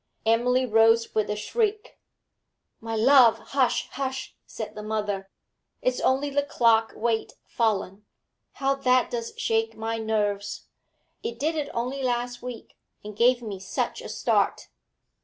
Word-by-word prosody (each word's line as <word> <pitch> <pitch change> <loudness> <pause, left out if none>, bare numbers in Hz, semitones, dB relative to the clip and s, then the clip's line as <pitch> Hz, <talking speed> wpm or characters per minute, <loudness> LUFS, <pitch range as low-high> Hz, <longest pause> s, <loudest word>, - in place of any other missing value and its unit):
Emily 250 +3 +3
rose 225 0 +4
with 215 -1 0
a 210 - 0
shriek. 425 - -2 0.8
'My 225 0 -4
love 240 0 +6
hush! 265 -3 0
hush!' 265 -1 -4
said 220 - -6
her 210 - -7
mother. 210 -2 -3 0.5
'It's 255 0 +1
only 275 +2 +1
the 285 +1 +2
clock 230 -5 +2
weight 225 0 -1
fallen. 210 -3 -1 0.5
How 275 0 +1
that 255 -2 +2
does 230 -1 -3
shake 225 0 0
my 225 +1 -3
nerves! 205 -2 -2 0.6
It 235 - -5
did 305 +6 0
it 295 -2 -2
only 250 +4 -3
last 245 -1 -2
week, 250 -2 -9 0.2
and 210 0 -8
gave 240 +2 +3
me 205 -4 -5
such 190 - -3
a - - -8
start.' - - 0
230 Hz, 140 wpm, -26 LUFS, 220-255 Hz, 0.8 s, love